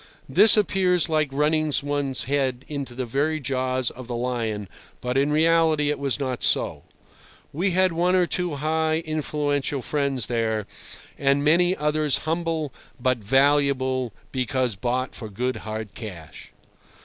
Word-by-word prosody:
This 215 0 +7
appears 185 -5 +2
like 155 -2 +1
running 150 +2 +1
one's 145 -2 0
head 135 -2 -1
into 140 -4 -5
the 130 0 -3
very 145 +6 0
jaws 130 -2 -1
of 130 -1 -10
the 120 - -4
lion, 115 -4 -2 0.3
but 125 0 -3
in 140 +2 +2
reality 160 -1 +3
it 150 - -3
was 140 -1 0
not 130 -3 -3
so. - - +1 0.7
We 180 +7 0
had 185 0 +2
one 175 +2 +2
or 180 -1 +4
two 175 -3 -1
high, 160 +2 0
influential 145 -3 -1
friends 140 -5 0
there, 110 -3 -1 0.5
and 140 0 +2
many 175 +4 +3
others 150 -2 +1
humble 160 -3 -2 0.3
but 125 0 +1
valuable 135 +1 +2 0.2
because 130 -2 -1
bought 125 +5 -2
for 110 - -7
good 125 +5 -2
hard 110 -1 -6
cash. 90 -9 -9
140 Hz, 145 wpm, -24 LUFS, 125-155 Hz, 0.7 s, This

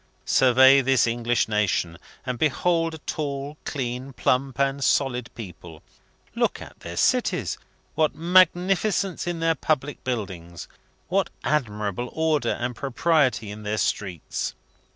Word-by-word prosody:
Survey 130 +2 +6
this 135 -1 +3
English 120 0 0
nation, 105 -6 0 0.3
and 125 -2 -3
behold 165 +2 +1
a 155 - -14
tall, 140 -1 -3
clean, 130 -1 -4
plump, 130 0 0
and 140 0 +1
solid 125 -2 +1
people! 85 -7 -10 0.5
Look - - 0
at - - -12
their - - -8
cities! - - +1 0.3
What 155 -1 +1
magnificence 185 +2 +2
in 170 -2 -3
their 165 0 +3
public 150 -3 -2
buildings! 95 -9 -5 0.4
What - - +1
admirable 110 -5 -1
order 155 -6 +1
and 120 0 -3
propriety 135 -5 +1
in 105 +1 -8
their 105 0 -2
streets! 95 -7 -2
130 Hz, 125 wpm, -24 LUFS, 115-155 Hz, 0.5 s, Survey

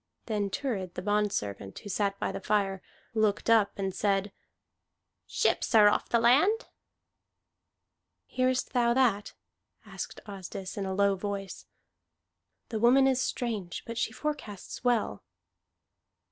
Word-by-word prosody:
Then 210 -3 -1
Thurid 190 -5 -3
the 180 - -5
bondservant, 195 - -1
who 205 - -8
sat 200 0 0
by - - -1
the 195 - -5
fire, 195 -2 0 0.3
looked 215 0 +1
up 220 -3 +4
and 195 -1 -2
said, 200 0 0 1.0
"Ships - - +1
are 210 -2 +8
off - - -1
the 235 - +3
land." 295 - +3 1.6
"Hearest 255 0 0
thou 240 -1 +3
that?" 230 -6 +2 0.5
asked - - -7
Asdis 195 -1 -7
in 195 -2 -3
a 190 - -2
low 200 0 +3
voice. 195 0 -5 1.0
"The 220 - -2
woman 250 +4 +5
is 260 -1 +2
strange, 215 -10 -3
but 230 - -6
she 225 - 0
forecasts 250 -8 -5
well." 235 - 0
210 Hz, 130 wpm, -29 LUFS, 195-240 Hz, 1.6 s, are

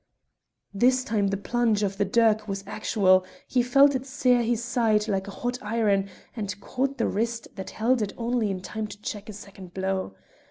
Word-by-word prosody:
This 255 +5 +3
time 215 -6 0
the 195 0 -1
plunge 225 0 +1
of 195 0 -2
the 200 - +3
dirk 220 +1 +3
was 195 -1 -4
actual; 190 -3 +3 0.2
he 250 - +2
felt 275 +4 +5
it 260 0 -3
sear 255 -3 +2
his 235 0 0
side 225 -3 +1
like 195 -2 -1
a 200 - -9
hot 245 +1 -1
iron, 210 -3 +1 0.3
and 205 -3 -4
caught 270 +6 -2
the 230 - +1
wrist 230 +2 -2
that 190 -2 -6
held 235 +2 +1
it 205 - -1
only 235 -2 0
in 190 -2 -3
time 215 +3 -4
to 205 - -11
check 210 +1 -5
a - - -6
second 195 -3 -12
blow. 190 - -2
215 Hz, 195 wpm, -26 LUFS, 195-240 Hz, 0.3 s, felt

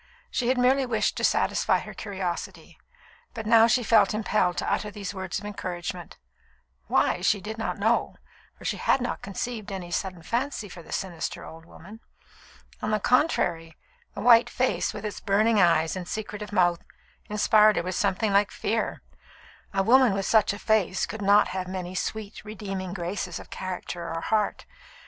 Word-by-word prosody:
She 245 - -1
had 255 +1 +2
merely 260 +2 +3
wished 225 -3 0
to - - -3
satisfy - - +2
her - - -9
curiosity; 180 -3 -5 0.6
but 225 -1 -5
now 225 +1 +6
she 245 +1 +2
felt 215 -2 +4
impelled 210 -4 +1
to - - -2
utter 210 - -2
these 205 -1 -6
words 190 -2 -4
of 205 - -7
encouragement 180 -3 -6 0.7
why, 175 - +2
she 200 +2 +2
did 220 +4 -7
not 225 - -2
know, 220 +4 +1 0.4
for - - -13
she - - -1
had - - +2
not 245 - -3
conceived 210 +2 -5
any 180 -3 -6
sudden 180 -1 -3
fancy 235 - -2
for 180 - -10
the - - -14
sinister 175 -4 -4
old 165 0 -12
woman. 195 +6 -13 0.8
On 215 - -2
the 215 0 +1
contrary, 175 - +1 0.4
the 200 - -5
white 235 +1 +6
face, 255 0 0
with 210 0 -7
its 210 - -4
burning 215 +1 +3
eyes 165 -1 +3
and 180 -2 -6
secretive 210 0 -5
mouth, 175 -3 +3 0.5
inspired 210 0 +5
her - - 0
with 185 +1 -3
something 200 +2 0
like 200 +1 +4
fear. 220 +1 -2 0.7
A 195 0 +1
woman 250 +1 +5
with 195 -1 -2
such 215 0 +4
a 205 - -5
face 215 -4 +1
could 220 0 -7
not 205 +1 +5
have 185 -1 -4
many 185 -1 -5
sweet, 205 +2 -4
redeeming 195 -3 -5
graces 180 -1 -4
of - - -13
character 180 -2 -5
or 165 0 -3
heart. 215 +2 0
200 Hz, 175 wpm, -26 LUFS, 185-220 Hz, 0.8 s, now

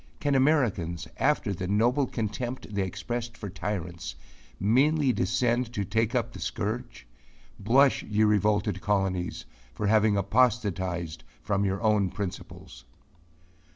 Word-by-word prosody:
Can 145 -1 0
Americans, 120 - +1
after 135 -7 +1
the 90 0 -4
noble 120 +7 +2
contempt 115 +1 -4
they 100 - 0
expressed 115 +5 -4
for 100 -3 -6
tyrants, 90 -4 -4 0.4
meanly 135 +6 +3
descend 120 +5 0
to 100 -3 -2
take 110 +4 0
up 120 -1 0
the - - -9
scourge? 105 - -4 0.5
Blush, 130 +7 +4
ye 105 +1 0
revolted 105 -2 +2
colonies, 95 -3 -1 0.3
for 105 - -2
having 105 0 +4
apostatized 95 -7 0 0.2
from 100 0 0
your 95 +3 -1
own 105 -3 +3
principles. 95 0 -7
105 Hz, 120 wpm, -27 LUFS, 95-120 Hz, 0.5 s, Blush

